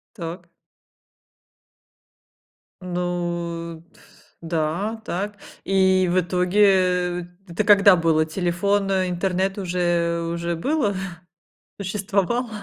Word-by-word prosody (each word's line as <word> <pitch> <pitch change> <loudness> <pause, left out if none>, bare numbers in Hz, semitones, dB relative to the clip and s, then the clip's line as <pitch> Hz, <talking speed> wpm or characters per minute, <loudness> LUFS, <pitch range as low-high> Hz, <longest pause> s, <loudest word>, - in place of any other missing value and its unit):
Так. 170 -1 -7 2.3
Ну 175 -2 -3
т - - -22 0.4
да, 170 +6 -2
так. 205 +2 -3 0.3
И 190 -1 +3
в 185 - +2
итоге, 180 +3 0 0.6
э, 175 - -7 0.2
это 175 +5 -1
когда 200 -1 +7
было? 165 -2 +2
Телефон, 190 +4 0
интернет 190 +1 0
уже 175 -2 0
уже 170 0 -2
было, 265 - 0 0.9
существовал? 200 +5 -1
180 Hz, 85 wpm, -23 LUFS, 170-195 Hz, 2.3 s, когда